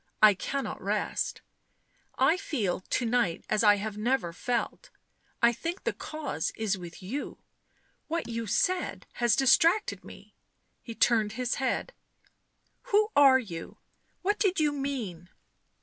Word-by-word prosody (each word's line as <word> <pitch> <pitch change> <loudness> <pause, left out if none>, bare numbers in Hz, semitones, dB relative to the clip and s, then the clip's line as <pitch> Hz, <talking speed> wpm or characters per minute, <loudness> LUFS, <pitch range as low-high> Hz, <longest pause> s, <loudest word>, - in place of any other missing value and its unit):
"I 215 -1 +8
cannot 275 +8 -4
rest. - - -2 0.8
I 270 +6 +4
feel 250 - -2
to 235 +6 -2
night 230 -8 0
as 215 +1 +2
I 205 -1 +7
have 210 +1 -5
never 220 -7 0
felt 240 +6 -3 0.3
— - - -33
I 235 0 +6
think 335 - -5
the - - -1
cause 295 - -4
is 215 -2 0
with 175 0 -10
you 255 +10 -5 0.4
— - - -41
what 330 +1 -2
you 230 -1 -4
said 365 - 0 0.2
has 240 -2 +4
distracted 330 +9 +3
me - - -13 0.2
;" - - -46
he 230 - -8
turned 220 -3 +2
his 250 0 -2
head. 265 - -1 1.0
"Who 420 +1 +3
are 275 -2 +7
you? 180 -10 -7 0.5
What 410 +3 +1
did 385 -4 +2
you 300 -1 +3
mean?" 245 - -4
240 Hz, 150 wpm, -28 LUFS, 210-290 Hz, 1.0 s, I